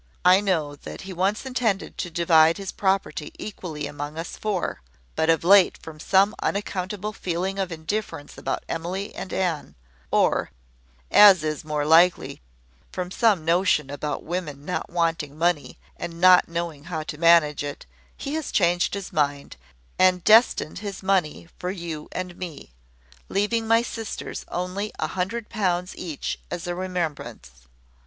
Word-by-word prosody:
I 185 +2 +7
know 160 -8 0
that - - -9
he 195 -1 -7
once 195 +7 0
intended 240 -6 -1
to 175 - -2
divide 165 -1 +4
his 195 -2 -5
property 190 -6 -1
equally 165 -8 -6
among 145 +1 -6
us 165 - -5
four; 205 -4 -2 0.3
but 160 - +1
of 165 -1 +3
late, 195 +1 +6
from 155 -1 -11
some 195 +5 +3
unaccountable 200 +1 -3
feeling 185 +1 -3
of 190 -2 -2
indifference 165 -1 -4
about - - -3
Emily 180 +5 -4
and - - -7
Anne, 175 -5 -2 0.3
or, - - +2 0.6
as 195 -6 +8
is 155 -1 -2
more 150 -1 -2
likely, 170 +3 +4 0.5
from 180 -1 -4
some 200 -7 +2
notion 165 -4 +2
about 145 +1 -4
women 155 -5 -5
not 180 - -3
wanting 165 -4 -1
money, 170 -2 0 0.2
and 170 -1 -6
not 180 0 +7
knowing 170 -3 -4
how 165 -3 -4
to 155 -1 -7
manage 165 -3 +5
it, 145 -1 -6 0.3
he 280 - -5
has 315 -1 -3
changed 175 0 +2
his 200 -1 -6
mind, 145 -3 -1 0.4
and 185 -1 +4
destined 220 -7 +4
his 200 -2 -6
money 185 -5 0
for 180 - -3
you 170 -5 -6
and 180 -1 -5
me, 170 - -8 0.6
leaving 220 +3 0
my 230 +1 +4
sisters 225 -2 -6
only 185 +4 -3
a - - -2
hundred 205 +5 -3
pounds 180 -5 -1
each 160 -5 -5
as 175 0 -5
a 175 - -2
remembrance. 175 - -4
175 Hz, 150 wpm, -24 LUFS, 160-195 Hz, 0.6 s, as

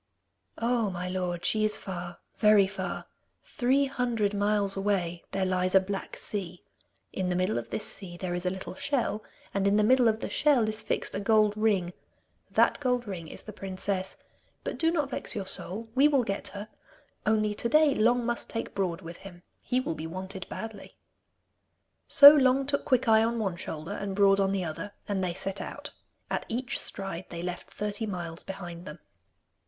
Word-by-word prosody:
'Oh, 235 -2 +1
my 180 -1 -4
lord, 180 -2 -3
she 215 -1 +2
is 215 0 +1
far, 175 -2 -6 0.2
very 210 -2 +5
far. 190 -2 -5 0.4
Three 265 +3 +1
hundred 240 -6 0
miles 205 -1 +1
away 190 -4 -1
there 190 0 0
lies 185 0 +1
a - - +9
black 195 +1 -5
sea. 185 -4 -3 0.5
In 185 -1 -1
the 180 - 0
middle 185 - +1
of 115 0 -9
this - - -2
sea 175 -3 -6
there 180 0 -3
is 175 0 -2
a 180 - +1
little 190 0 -6
shell, 230 -1 -1 0.3
and 195 0 +1
in 200 - +3
the 210 - +4
middle 250 +2 +5
of 220 -1 +2
the - - -3
shell 275 -7 +3
is 215 0 -1
fixed - - -2
a - - -2
gold 215 0 +3
ring. 200 -5 +1 0.6
That - - +3
gold 250 -3 0
ring 175 -5 -6
is - - -8
the 215 - -9
princess. 190 -1 -2 0.5
But - - -4
do 325 - +3
not 300 -5 0
vex - - -2
your 200 -2 -3
soul; 205 +4 -3
we 270 +3 +5
will 280 -4 +3
get 200 -3 -3
her. 200 +2 -7 0.6
Only 215 -1 +2
to 235 +3 -2
day, 305 +2 +5
Long 240 +1 +2
must 240 0 -2
take 230 - -4
Broad 185 -3 -1
with 170 -1 -9
him. 180 -3 -12 0.2
He 250 0 0
will 255 - -2
be 160 0 -6
wanted 190 +2 -6
badly.' 220 -2 -8 1.1
So 285 +1 +11
Long 270 -2 +4
took 280 +1 -1
Quickeye 240 -5 +4
on 230 +1 0
one 195 -6 -1
shoulder, 160 0 -6
and 200 -1 -4
Broad 200 0 +5
on 195 0 +2
the 190 -2 -1
other, 185 +6 -6
and 195 -2 -1
they 175 -2 -2
set 195 +1 -2
out. - - -7 0.4
At - - -2
each 255 +4 -2
stride 190 -2 -4
they 170 0 -6
left 180 0 -5
thirty 210 +1 -3
miles 175 -4 -5
behind 175 -3 -8
them. 150 +2 -8
200 Hz, 190 wpm, -28 LUFS, 185-225 Hz, 1.1 s, So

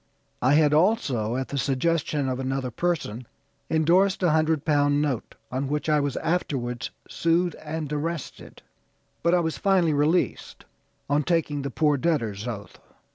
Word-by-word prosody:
I 130 +3 +4
had 150 -1 +4
also, 150 - +2
at 130 0 -3
the 140 - -2
suggestion 145 +1 0
of 130 0 -2
another 135 -1 -2
person, 130 -7 -2 0.4
endorsed 180 +5 +3
a 175 - +4
hundred 155 -1 +1
pound 145 -1 +3
note, 140 -6 -2 0.2
on 130 +2 -2
which 150 +2 -2
I 150 -1 +4
was 140 -2 -1
afterwards 135 -8 -2 0.2
sued 170 +1 +1
and 155 -1 -4
arrested; 160 +1 -5 0.6
but 170 +1 +3
I 175 - +3
was 160 -1 -2
finally 185 -5 +3
released 150 +5 0 0.4
on 145 +1 +2
taking 150 -2 0
the 140 - -3
'poor 150 +1 +2
debtor's 125 -9 -1
oath.' 105 -4 -7
150 Hz, 150 wpm, -25 LUFS, 135-165 Hz, 0.6 s, I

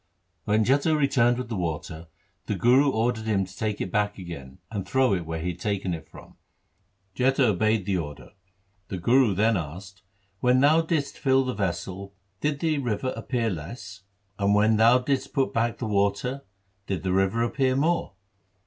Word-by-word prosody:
When 110 +1 +2
Jetha 140 +5 +3
returned 120 -4 +3
with 125 - -4
the 115 - -3
water, 80 -2 -4 0.4
the - - -1
Guru 130 +4 +4
ordered 115 -2 0
him 100 -3 +1
to 95 0 -14
take 105 -1 -2
it. 95 - -3
back 105 -1 0
again, 80 -8 -9
and 105 -3 -3
throw 130 0 +2
it 85 -4 -2
where 80 0 -3
he 85 +3 -2
had - - -11
taken 100 -3 -2
it 80 - -8
from. - - -15 0.8
Jetha 130 -1 +3
obeyed 110 0 +1
the 95 -2 0
order. 75 -4 -7 0.6
The 95 - -4
Guru 115 +3 +3
then 110 +2 +3
asked, 95 +4 -7 0.2
' 95 0 -42
When 125 +1 +4
thou 150 +4 +5
didst 160 -3 -2
fill 135 -1 +3
the 130 - -2
vessel 100 0 -4 0.2
did 145 +2 -1
the 155 -3 +1
river 125 -1 -2
appear 115 -4 -1
less; 95 +4 -8 0.4
and 100 +1 +3
when 110 +1 +4
thou 115 +3 +6
didst 135 +1 -2
put 135 -1 0
back 115 0 0
the 125 - -4
water 105 +6 0 0.4
did 95 -5 -3
the 95 - 0
river 95 +5 +2
appear 130 +2 +1
more 160 - 0
110 Hz, 185 wpm, -26 LUFS, 95-130 Hz, 0.8 s, thou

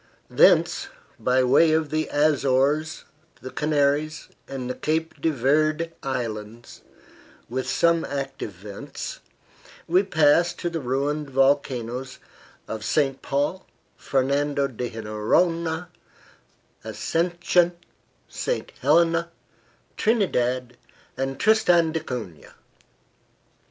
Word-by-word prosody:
Thence, - - +4 0.3
by 130 +1 +2
way 150 +5 +5
of 160 -1 0
the 155 0 -1
Azores, 145 +1 +1 0.4
the 130 - -8
Canaries 150 +1 0 0.2
and 130 -2 -5
the 125 - -2
Cape 160 +4 -2
de 165 - +2
Verde 155 +4 +1
Islands, 115 -4 -5 0.7
with 130 +2 -3
some 170 -1 +2
active 135 -6 -4
vents, 100 +2 -8 0.7
we 180 +3 +4
pass 170 -2 +3
to 175 - -3
the 165 - -2
ruined 140 +3 -2
volcanoes 130 -2 0 0.5
of 110 -1 -5
St. 135 +2 0
Paul, 145 +7 -2 0.3
Fernando 140 +1 0
de 125 -1 -5
Noronha, 160 +11 0 0.9
Ascension, 175 +1 +1 0.5
St. - - -3
Helena, 165 +4 +3 0.7
Trinidad 125 - 0 0.4
and 135 +1 -3
Tristan 175 -7 +4
da 160 - -1
Cunha. 115 - -7
145 Hz, 95 wpm, -24 LUFS, 130-165 Hz, 0.9 s, way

